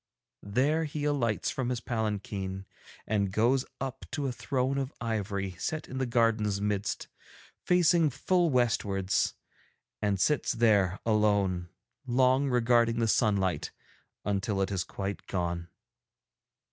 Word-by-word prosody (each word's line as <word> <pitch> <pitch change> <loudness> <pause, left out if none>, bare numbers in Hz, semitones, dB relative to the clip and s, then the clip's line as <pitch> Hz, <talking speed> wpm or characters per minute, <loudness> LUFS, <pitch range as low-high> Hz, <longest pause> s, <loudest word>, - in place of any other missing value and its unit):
'There 140 +10 +1
he 150 0 -4
alights 135 -7 0
from 130 -2 -2
his 125 -2 -1
palanquin 100 -4 -3 0.4
and 100 -3 0
goes 120 +6 +2 0.2
up 135 -1 -5
to 145 -2 -3
a 135 - 0
throne 130 +2 -1
of 135 0 -3
ivory 100 -4 -2
set 155 +7 -3
in 130 - -5
the 130 - 0
garden's 115 -4 +2
midst, 105 0 -2 0.6
facing 175 -2 +4
full 170 +6 +1
westwards, 100 -7 +1 0.7
and 100 -2 +1
sits 150 +6 +2
there 105 -5 +3
alone, 100 -5 +2 0.4
long 130 +2 +3
regarding 120 -1 +3
the 115 -1 +1
sunlight 100 -5 +1 0.6
until 100 0 -1
it 95 0 0
is 95 -3 0
quite 100 +4 -5
gone. 85 -2 -2
115 Hz, 125 wpm, -29 LUFS, 100-130 Hz, 0.7 s, facing